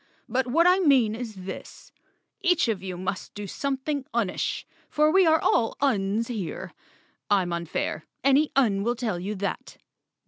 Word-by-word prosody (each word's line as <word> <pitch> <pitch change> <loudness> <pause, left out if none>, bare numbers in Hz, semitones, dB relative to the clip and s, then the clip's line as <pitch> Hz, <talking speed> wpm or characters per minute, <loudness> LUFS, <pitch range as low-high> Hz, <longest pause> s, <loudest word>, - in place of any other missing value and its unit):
"But 255 +2 0
what 330 +7 +3
I 365 +1 +5
mean 265 - +4
is 220 -5 -7
this: 190 - -9 0.5
Each 360 -6 +3
of 215 -5 -1
you 185 -2 -5
must 185 +1 -4
do 205 - -5
some¬ 270 +7 -2
thing 290 -2 -1
unish, 210 -6 -1 0.3
for 305 +1 +3
we 380 0 +5
are 320 0 +5
all 225 - +1
Uns 220 -4 +1
here. 210 -9 -5 0.6
I'm 190 -4 +2
unfair—any 265 - 0
Un 220 -8 +3
will 240 +4 0
tell 225 -7 -2
you 200 +4 -4
that. 200 0 -4
230 Hz, 160 wpm, -26 LUFS, 195-280 Hz, 0.6 s, I